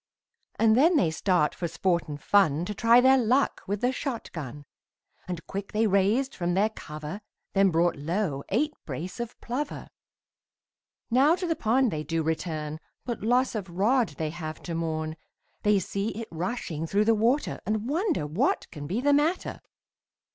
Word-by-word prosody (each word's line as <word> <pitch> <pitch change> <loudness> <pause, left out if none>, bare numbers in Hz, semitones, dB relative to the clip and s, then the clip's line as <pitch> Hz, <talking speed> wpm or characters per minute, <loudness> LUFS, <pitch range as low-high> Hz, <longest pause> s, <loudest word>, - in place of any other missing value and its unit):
And 220 -1 +4
then 320 +7 +5
they 170 - +3
start 175 -2 +1
for 175 - -3
sport 175 +1 0
and 145 -1 -6
fun, 170 -4 +3
To 210 - -3
try 230 +3 +5
their 265 +1 +6
luck 255 +4 +2
with 205 +1 -2
the 250 - +2
shot 260 -2 -4
gun, 145 -2 -7 0.6
And 175 -3 -5
quick 195 0 -6
they 220 +1 +2
raised 210 +7 +2
from 175 -1 -1
their 205 +3 +3
cover, 155 +1 -7 0.3
Then 195 0 +4
brought 170 -1 +2
low 155 -1 -2
eight 295 +9 +1
brace 160 - -6
of 235 0 -5
plover. 275 +5 -4 1.2
Now 275 +7 +5
to 365 0 -4
the 330 -2 0
pond 245 0 +2
they 155 -1 -3
do 165 +2 -1
return, 155 -1 -3 0.3
But 240 -3 -4
loss 250 +4 +2
of 200 -5 -4
rod 220 +7 +2
they 155 -2 -2
have 160 -2 -6
to 170 - -5
mourn, 160 -1 -2 0.4
They 210 -1 +4
see 195 +2 -2
it 230 - -6
rushing 165 -2 -3
through 205 +5 +2
the 225 - +5
water, 235 +7 +1
And 215 +1 -1
wonder 330 - 0
what 235 - 0
can 145 -3 -7
be 200 +9 -1
the 285 +2 +3
matter. 305 +5 +1
200 Hz, 175 wpm, -27 LUFS, 165-245 Hz, 1.2 s, their